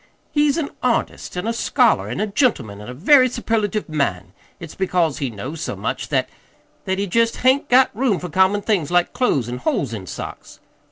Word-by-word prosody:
He's 295 -1 +2
an 305 -4 -2
artist 240 -6 -1
an' 180 - -3
a 230 - 0
scholar 235 0 +2
an' - - -4
a 210 - +1
gentleman, 175 - 0
an' 105 - -9
a - - -6
very 255 - +5
superlative 220 -3 -1
man. 95 - -2 0.3
It's 165 -3 -9
because 180 -5 0
he 135 - -1
knows 130 +9 -7
so 130 - -3
much 95 - -4
that - - +1 0.6
that 190 0 -1
he 200 - -1
jest 230 +4 +1
hain't 265 +2 +3
got 255 -3 +4
room 235 -4 +1
for 180 - -6
common 190 +5 +2
things 185 -10 0
like 175 0 +2
clothes 245 - +1
an' 125 +1 -5
holes 125 0 -1
in 95 -4 -6
socks." - - -8
190 Hz, 200 wpm, -21 LUFS, 140-235 Hz, 0.6 s, very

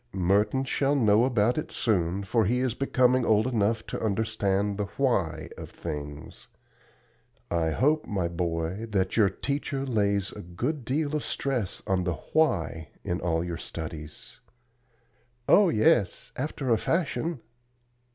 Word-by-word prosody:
Merton 100 +8 +2
shall 140 +1 +1
know 110 -3 +4
about 120 +1 +2
it - - -6
soon, 95 -3 0
for 110 +3 +1
he 120 +6 +1
is 125 -2 0
becoming 130 -1 +2
old 110 -1 +3
enough 115 -3 0
to - - -5
understand 105 -2 0
the 105 - 0
'why' 115 - 0
of - - -7
things. 75 -2 -7 1.0
I 85 -2 +1
hope, 150 - +1
my 95 -4 -1
boy, 85 +4 -2
that 95 -3 0
your 105 -4 +5
teacher 140 +5 -3
lays 100 -5 +1
a 105 - -8
good 115 - -3
deal 145 +3 0
of 150 - -1
stress 125 -9 -2
on 95 -1 +1
the 90 -2 -1
WHY 85 - 0 0.2
in 90 +1 -2
all 85 -1 0
your 85 -1 -4
studies." 80 -2 -7 1.1
"Oh, 205 -3 +6
yes, 105 - +2
after 135 -1 -2
a 115 - +4
fashion." 165 -2 -1
105 Hz, 140 wpm, -27 LUFS, 90-130 Hz, 1.1 s, Oh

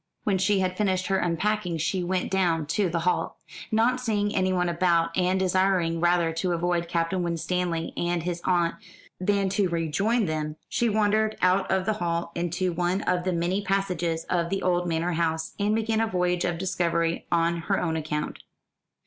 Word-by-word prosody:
When 195 -3 +1
she 195 +1 +2
had 185 0 -1
finished 190 -3 +1
her 195 0 +2
unpacking 180 +1 0
she 175 +4 -1
went 180 +1 -1
down 175 -5 +1
to 180 +5 0
the 170 0 -1
hall. 180 +2 0 0.3
Not 235 +4 +2
seeing 205 -3 0
anyone 185 -1 +1
about, 170 -1 +1
and 185 +1 +2
desiring 185 -3 +2
rather 175 -1 +2
to 175 +2 -1
avoid 170 0 0
Captain 170 +2 0
Winstanley 170 0 -2
and 175 -1 -1
his 175 0 -3
aunt 175 -2 +2 0.5
than 200 +1 +1
to 195 -1 +1
rejoin 170 +8 +1
them, 155 -2 -2
she 235 - +1
wandered 215 0 +1
out 185 +1 +2
of 190 -1 +1
the 215 - +1
hall 170 0 -1
into 175 +1 -1
one 180 +3 0
of 180 0 0
the 185 - +1
many 175 +4 0
passages 180 -4 -1
of 170 -1 -1
the 195 +1 -2
old 175 -1 +1
manor 165 +1 0
house, 160 -1 -1
and 205 +1 +2
began 225 0 0
a 225 - +1
voyage 180 -2 0
of 175 -1 -1
discovery 170 -2 -1
on 170 0 +2
her 190 +4 -1
own 165 -2 -1
account. 150 -1 -3
180 Hz, 180 wpm, -26 LUFS, 170-195 Hz, 0.5 s, she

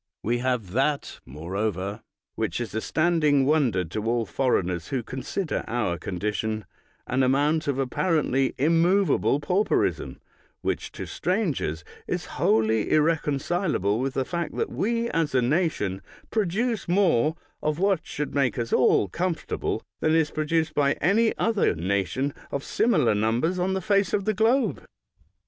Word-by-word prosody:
We 120 +3 0
have 125 -7 -1
that, 140 +6 -1
moreover, 95 - -3 0.3
which 85 - -2
is 120 -3 -4
a 110 - -1
standing 155 -4 +2
wonder 130 - +2
to 105 +7 -4
all 115 0 +1
foreigners 90 -11 0
who 130 -3 -2
con 130 +4 -6
sider 160 +5 -2
our 110 -8 -1
condition 105 +4 -3 0.2
— - - -38
an 130 +1 +1
amount 145 +5 +2
of 140 -2 0
apparently 135 -1 +1
immovable 165 +1 +3
pauperism 185 +7 0 0.4
which - - -2
to - - -6
strangers 155 - -1 0.2
is - - -2 0.2
wholly 110 0 +2
irreconcilable 150 - +1
with 130 +1 -2
the 135 - 0
fact 170 +1 -3
that - - -2
we, 230 +2 0
as 165 -4 0
a 130 - +4
nation, 120 - 0 0.3
produce 220 +3 0
more 170 -6 +3 0.3
of 150 0 -1
what 195 0 +2
should 150 0 -4
make 130 -7 +1
us 115 -1 -2
all 115 -4 +4
comfortable 170 - -2 0.2
than 155 0 +2
is 160 -2 +2
produced 160 +1 0
by 140 -1 +2
any 220 +7 +2
other 220 - +1
nation 100 - -1 0.2
of 140 - -3
similar 165 - +2
numbers 115 - 0
on 185 +2 0
the 190 - -1
face 200 0 +1
of 200 - 0
the 215 - +1
globe. 230 +6 +1
140 Hz, 150 wpm, -25 LUFS, 110-175 Hz, 0.4 s, a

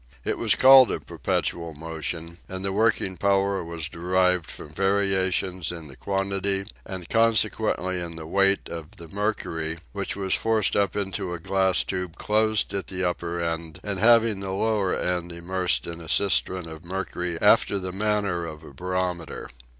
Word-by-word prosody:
It - - -1
was - - +3
called 130 -1 +8
a - - -2
perpetual 85 -2 -2
motion, 80 +2 -5
and 95 +1 -5
the 95 - -1
working 105 -3 +1
power 100 -1 +1
was 85 -2 -4
derived 90 0 +1
from - - -9
variations 95 -1 0
in 85 -3 -8
the 65 - -12
quantity, 100 +1 -1 0.2
and 95 -2 -6
consequently 110 -5 +2
in 85 -1 -6
the 80 -1 -8
weight 100 +4 +2
of 80 -2 -8
the 85 - -10
mercury, 85 -5 -2
which - - -3
was 95 -1 -1
forced 110 -3 +1
up 100 -1 +1
into 95 -3 -2
a - - -7
glass 95 +2 +3
tube 90 -3 -4
closed 110 0 +1
at 100 -1 -3
the 95 -1 -1
upper 85 0 -3
end 80 -1 -3
and 100 -2 -3
having 115 -1 +5
the 95 -1 -5
lower 100 -2 +1
end 90 -1 -2
immersed 90 +2 0
in 85 0 -7
a 80 - -9
cistern 95 -3 +2
of 80 0 -10
mercury 90 -1 -4
after 100 - +4
the 95 -1 -4
manner 100 -3 0
of 80 -2 -7
a 70 - -12
barometer. 90 -1 -3
95 Hz, 165 wpm, -25 LUFS, 85-100 Hz, 0.2 s, called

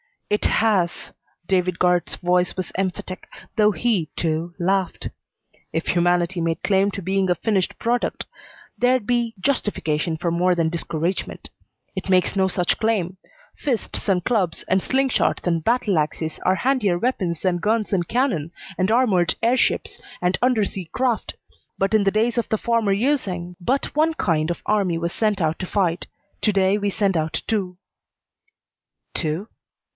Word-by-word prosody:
"It 210 - +1
has!" 200 -6 +1 0.3
David 180 -1 +1
Guard's 180 -1 +2
voice 180 0 +1
was 185 -1 -4
emphatic, 185 -1 -3 0.3
though 210 -1 +5
he, 210 -7 0
too, 165 +1 -2
laughed. 190 0 0 0.6
"If 160 +1 -2
humanity 175 +1 +2
made 165 0 -1
claim 195 0 +3
to 195 - -6
being 190 +1 +1
a 180 - +3
finished 190 +1 0
product, 240 +1 -1 0.5
there'd 250 -2 +2
be 235 -1 0
justification 170 - 0
for 170 +1 -1
more 180 +2 +2
than 165 -2 +1
discouragement. 170 +1 -3 0.5
It 190 0 -4
makes 185 +1 +3
no 190 0 +3
such 180 -1 0
claim. 195 -5 0 0.4
Fists 255 -6 -3
and 180 -2 +2
clubs, 195 -8 0
and 190 +1 +3
slingshots 265 +4 +1
and 165 -2 +1
battle 220 -6 +2
axes, 155 +1 -2
are 185 - +4
handier 225 -6 +1
weapons 185 -7 -1
than 185 -2 +1
guns 215 +4 0
and 175 -3 +1
cannon, 220 - 0 0.3
and 185 +2 +2
armored 215 -8 +3
air 240 +3 +4
ships - - 0 0.2
and 180 0 +1
under 245 -3 +3
sea 190 -2 -5
craft, 245 +5 -1 0.4
but 195 +2 0
in 215 -2 +4
the - - +5
days 235 +2 +1
of 235 - -2
the 220 - +1
former 230 -3 +1
using, 195 -7 -1
but 255 +10 -1
one 315 +2 +3
kind 160 - 0
of 175 - -4
army 195 -5 +1
was 170 +1 -2
sent 210 -3 0
out 160 0 0
to 185 - -4
fight. 180 -4 0 0.3
To 210 - +2
day 195 +1 +3
we 205 0 0
send 195 -2 +1
out 155 -1 -2
two." 190 -5 -2 1.4
"Two?" 165 +7 -2
190 Hz, 160 wpm, -22 LUFS, 175-220 Hz, 1.4 s, though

